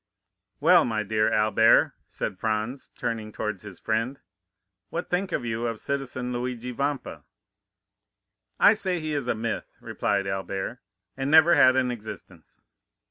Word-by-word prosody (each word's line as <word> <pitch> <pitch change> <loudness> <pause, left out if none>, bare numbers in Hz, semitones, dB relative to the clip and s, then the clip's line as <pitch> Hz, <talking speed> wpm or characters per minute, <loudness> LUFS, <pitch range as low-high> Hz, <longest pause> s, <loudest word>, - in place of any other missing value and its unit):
20129m - - -46
"Well, - - +6
my 110 -3 -1
dear 110 +1 +1
Albert," 110 +1 +4
said 95 -3 -5
Franz, 110 +4 -2
turning 110 -2 -3
towards 105 -3 -4
his 105 -4 -10
friend; 115 +5 -2 0.7
"what 170 - -5
think 185 +2 0
you 115 -3 -2
of 115 -2 -4
citizen 130 -3 -3
Luigi 125 0 -4
Vampa?" 140 +2 -3 1.4
"I 205 - +7
say 190 -5 0
he 155 -1 -3
is 140 -4 -2
a - - +1
myth," 115 +1 -4
replied 100 -1 -1
Albert, 95 +4 -4 0.4
"and 135 +1 -2
never 160 +2 +7
had 130 0 +6
an 130 -1 +2
existence." 105 -7 -10
120 Hz, 140 wpm, -26 LUFS, 110-135 Hz, 1.4 s, I